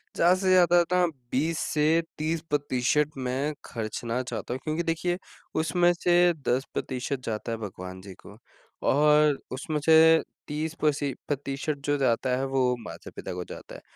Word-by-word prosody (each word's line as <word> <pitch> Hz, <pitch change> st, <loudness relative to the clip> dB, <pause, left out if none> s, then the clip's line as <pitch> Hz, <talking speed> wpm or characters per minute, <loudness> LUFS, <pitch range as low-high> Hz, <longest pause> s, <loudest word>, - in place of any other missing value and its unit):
ज़्यादा 175 Hz, +2 st, +5 dB
से 185 Hz, 0 st, 0 dB
ज़्यादा 175 Hz, -1 st, +6 dB
ना 180 Hz, 0 st, +4 dB, 0.3 s
20 160 Hz, +5 st, 0 dB
से 155 Hz, +2 st, +3 dB, 0.2 s
30 160 Hz, +1 st, -1 dB
प्रतिशत 145 Hz, 0 st, +1 dB
मैं 130 Hz, +3 st, -1 dB
खर्चना 115 Hz, +1 st, -3 dB
चाहता 120 Hz, -1 st, -5 dB
हूँ, 130 Hz, -, -4 dB
क्योंकि 155 Hz, +2 st, -1 dB
देखिए 170 Hz, +2 st, -1 dB, 0.4 s
उसमें 175 Hz, +3 st, +3 dB
से 175 Hz, 0 st, +3 dB
10 130 Hz, +2 st, +1 dB
प्रतिशत 130 Hz, +1 st, -3 dB
जाता 110 Hz, +1 st, -3 dB
है 115 Hz, -, -2 dB
भगवान 95 Hz, -3 st, -7 dB
जी 95 Hz, 0 st, -10 dB
को 105 Hz, -, -12 dB, 0.5 s
और 150 Hz, 0 st, +4 dB
उसमें 150 Hz, +4 st, -3 dB
से 160 Hz, 0 st, +7 dB, 0.3 s
30 155 Hz, +2 st, -3 dB
प्रसि 145 Hz, -2 st, +1 dB
प्रतिशत 140 Hz, +1 st, -2 dB
जो 145 Hz, 0 st, +1 dB
जाता 130 Hz, -1 st, +1 dB
है 135 Hz, -, -1 dB
वो 130 Hz, -2 st, +1 dB
माता-पिता 115 Hz, -, -8 dB
को 90 Hz, 0 st, -4 dB
जाता -, -, -9 dB
है -, -, -10 dB
145 Hz, 160 wpm, -27 LUFS, 125-160 Hz, 0.5 s, से